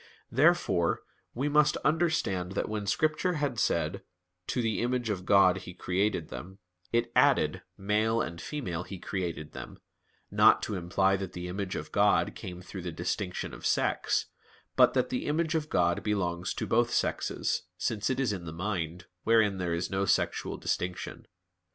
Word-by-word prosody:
Therefore 120 - +3 0.3
we 135 +5 0
must 150 0 +4
understand 155 - +1
that - - -1
when 105 -2 -3
Scripture 155 - +1
had 145 -7 -1
said, 85 -3 0 0.5
"to - - -1
the 115 -3 0
image 120 -2 0
of 90 -3 -4
God 95 -2 +6
He 90 -1 -9
created 90 -1 -1
him," 95 +2 -8 0.3
it 115 0 +1
added, - - +4 0.2
"male 105 +3 +1
and 85 -5 -3
female 95 - -4
He 95 +2 -7
created 85 -5 -4
them," - - -9 0.5
not - - +5
to 110 - -2
imply 95 +1 +1
that 95 -2 -5
the 90 0 -5
image 95 +1 -3
of - - -5
God - - +3
came 90 0 -8
through 95 0 -7
the 90 0 -4
distinction 90 +3 -3
of - - -10
sex, - - +1 0.5
but - - +5
that - - +2
the - - -2
image 155 +2 +1
of 155 -2 -1
God 85 0 +2
belongs 95 -3 -1
to - - -2
both 120 +1 +2
sexes, - - -1
since 105 -2 -1
it 130 - 0
is 125 -6 +1
in 90 -3 -6
the 80 - -5
mind, 90 -1 -3 0.2
wherein 110 -4 +3
there 85 -2 0
is 85 +1 -3
no 95 +1 +1
sexual - - 0
distinction. 90 0 -3
100 Hz, 170 wpm, -29 LUFS, 90-120 Hz, 0.5 s, God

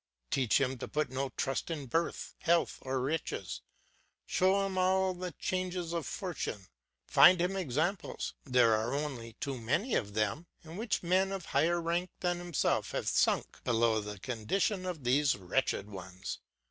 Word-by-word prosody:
Teach 130 -3 +3
him 130 -2 0
to - - -5
put 150 -3 -1
no 135 +1 -1
trust 135 +5 -1
in 155 -4 -3
birth, 165 +7 -1
health, 170 0 +2
or 130 0 -1
riches; 150 +6 -2 0.6
show 195 +2 +3
him 195 -1 -3
all 185 0 +3
the 180 0 -5
changes 180 -2 -2
of 170 -3 -2
fortune; 165 - -4 0.4
find 180 0 +7
him 180 +3 +1
examples 175 +2 -1
there 125 -4 +4
are 110 +5 0
only 130 -6 -4
too 135 +3 -4
many 145 - 0
of 100 -2 0
them 110 +10 0 0.2
in 160 +1 -10
which 220 0 -1
men 185 +2 +2
of 190 -4 -4
higher 175 +2 +2
rank 170 +2 -1
than 175 -1 0
himself 175 -3 0
have - - -2
sunk - - +1
below 115 -2 +2
the 105 0 -6
condition 155 - -1
of 165 -6 -4
these 140 +4 +3
wretched 95 +1 0
ones. 90 -10 -7
155 Hz, 160 wpm, -32 LUFS, 120-180 Hz, 0.6 s, find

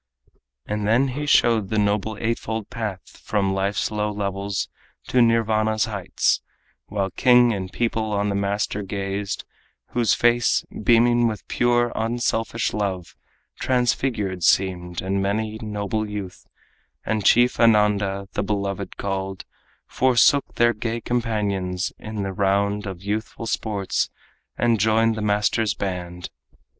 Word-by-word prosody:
And 105 0 -2
then 125 +5 +3
he 145 +3 -4
showed 115 -7 +3
the 110 - -1
noble 105 +1 0
eightfold 115 -1 -3
path 110 -6 -6
From 100 -2 0
life's 95 +2 -1
low 105 0 -1
levels 100 -1 -2 0.4
to 125 - +4
Nirvana's 110 -2 +2
heights, 100 -6 0 0.5
While 100 -2 -2
king 120 +1 +5
and 95 -2 -4
people 110 -2 -1
on 105 0 0
the - - -1
master 100 +1 -1
gazed, 100 0 -4 0.4
Whose 115 -5 +2
face, 120 0 +2 0.2
beaming 120 +1 +4
with 110 -2 -5
pure, 120 0 +2
unselfish 115 0 -1
love, 95 -4 -3 0.4
Transfigured 120 -6 0
seemed; 90 -2 +1
and 95 +1 0
many 110 +2 -1
noble 105 0 -3
youth, 100 -3 -7 0.6
And 110 -1 -1
chief 120 +5 +4
Ananda, 105 -3 +3
the - - -1
Beloved 100 -1 -3
called, 95 -1 -4 0.4
Forsook 130 +2 +3
their 120 0 +4
gay 115 +2 -3
companions 105 -7 -1
and 110 -2 -5
the 95 - -3
round 100 +1 +1
Of 95 -1 -7
youthful 110 +3 -3
sports, 105 -3 -1 0.5
and 115 -2 +2
joined 110 +2 +3
the 110 - -4
master's 105 +1 +1
band. 90 -3 -5
105 Hz, 130 wpm, -23 LUFS, 100-115 Hz, 0.6 s, king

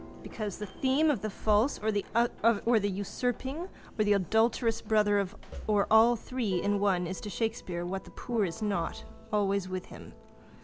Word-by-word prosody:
Because 210 -4 -5
the 210 - -5
theme 270 +8 +2
of 245 -9 -2
the 215 - -2
false 215 +5 +2
or 220 +1 0
the 225 0 +2
usurping 250 - -3 0.3
or - - +5
the 205 0 +4
adulterous 225 +4 +2
brother 205 -2 +3 0.4
or 205 -2 +3
all 225 +2 +7
three 225 -5 -2
in 205 +2 +1
one 190 -3 +2
is 185 +1 -5
to 210 - -6
Shakespeare, 205 -6 -3
what 190 +2 -4
the - - -12
poor 235 -4 -1
are 195 +6 -6
not, 195 -5 -2 0.3
always 200 -2 +1
with 185 -1 -4
him. - - -12
210 Hz, 165 wpm, -30 LUFS, 200-230 Hz, 0.4 s, all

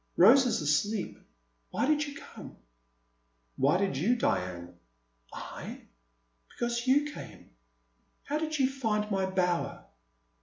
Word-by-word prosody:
Rose 250 +8 +7
is 200 - 0
asleep. 190 +8 0 0.5
Why - - 0
did 300 +1 +2
you 285 - -8
come? - - -11 1.0
Why 140 +6 +3
did 195 -6 0
you, 210 - +2
Diane?" 90 - -1 0.6
I? - - -8 0.7
Because 240 +1 -2
you 290 +3 +3
came. - - -11 0.7
How 295 +2 -2
did 310 -1 -2
you 265 -2 +4
find 220 -6 -1
my 190 -1 +1
bower? 180 -2 -1
215 Hz, 120 wpm, -30 LUFS, 180-270 Hz, 1.0 s, Rose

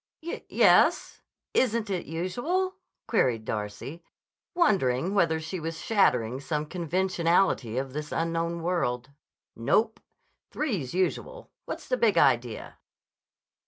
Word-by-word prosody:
"Y 340 - -5
y - - -7
yes. - - +4 0.3
Isn't 230 -4 +1
it 180 -3 -3
usual?" 240 - -1 0.3
queried 120 - +1
Darcy, 105 +11 -5 0.5
wondering 185 - +2
whether 165 -5 +2
she 165 +4 -5
was 165 0 -4
shattering 125 - +2
some 150 +1 -2
conventionality 175 - +1
of 130 0 -3
this 150 0 -5
unknown 165 0 -1
world. 130 -8 -1 0.4
"Nope. 215 - +1 0.5
Three's 190 - -2
usual. - - -2
What's - - -6
the 255 - 0
big 230 -4 +3
idea?" 120 -3 +1
165 Hz, 115 wpm, -27 LUFS, 130-200 Hz, 0.5 s, yes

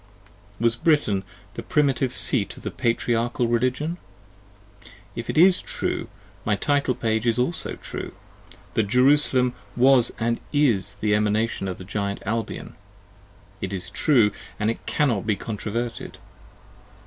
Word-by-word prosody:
Was 115 0 +2
Britain 120 -11 +2 0.3
the - - -6
Primitive 135 -3 +1
Seat 105 -6 +1
of - - -13
the - - -3
Patriarchal 120 0 0
Religion? 130 +8 0 1.2
If 115 - -6
it - - -2
is 180 +3 +6
true, - - -3 0.4
my 105 - +1
title 140 +4 +1
page 110 -1 -1
is 115 - +3
also 145 +7 -1
True, - - -6 0.6
that 110 -2 +1
Jerusalem 125 +1 +4 0.2
was 125 -1 +5 0.2
& - - -19
is 110 -10 +2
the 105 -1 +2
Emanation 105 0 0
of 90 - -4
the 95 - -10
Giant 100 0 -3
Albion. 115 +2 -3 0.9
It 95 - -3
is 90 -2 -5
True, 120 -9 +3 0.3
and 105 +1 +1
5 - - -8
cannot 115 -8 0
be 105 - +2
controverted. 115 +3 -5
115 Hz, 135 wpm, -24 LUFS, 105-130 Hz, 1.2 s, is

